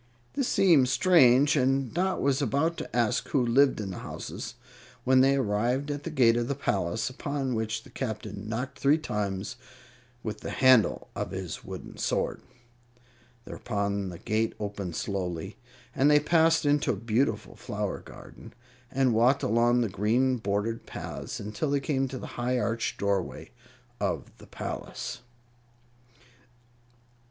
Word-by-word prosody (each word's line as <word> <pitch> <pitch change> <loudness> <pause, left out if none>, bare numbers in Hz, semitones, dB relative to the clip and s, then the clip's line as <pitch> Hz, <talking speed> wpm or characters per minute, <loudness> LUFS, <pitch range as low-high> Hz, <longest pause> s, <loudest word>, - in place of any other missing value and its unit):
This 275 -3 0
seemed 160 -10 +4
strange, 145 -3 +5
and 135 -2 +1
Dot 185 +2 0
was 140 +1 +2
about 145 +6 0
ask 120 -2 +1
who 130 -4 +1
lived 130 +3 +4
in 100 -3 -4
the 90 - -6
houses, - - -7 0.5
when 130 0 +5
they 135 +1 +4
arrived 125 +4 0
at 145 0 -5
the - - -2
gate 125 -7 +4
of 120 0 0
the 140 - -1
palace, 110 -4 -1
upon 135 0 -3
which 110 -1 -2
the - - -16
Captain 105 -4 -5
knocked 125 +4 -4
three 140 +3 +4
times 100 -7 -3 0.7
with 110 - -4
the - - -6
handle 130 -4 +4
of - - -3
his - - -5
wooden - - -8
sword. - - -1 1.0
Thereupon 100 -1 -2
the 90 - -8
gate 110 +5 -1
opened 100 -5 -4
slowly, 95 -1 -3 0.4
and 140 +2 +4
they 150 0 +6
passed 160 +1 +3
into 145 -2 +2
a - - -3
beautiful 115 +6 -1
flower - - -4
garden, - - -13 0.3
and 130 -2 +2
walked 120 +5 +3
along 120 +2 +3
the 115 - +1
green 120 +7 +1
bordered 105 +2 -2
paths - - -6
until 105 +9 -3
they 140 0 +2
came 135 -1 0
to 130 0 -6
the - - -7 0.2
high 125 +1 +1
arched 115 -1 -1
doorway 100 -2 -2 0.5
of - - -3
the - - -14
palace. - - -6
125 Hz, 145 wpm, -28 LUFS, 105-140 Hz, 1.0 s, they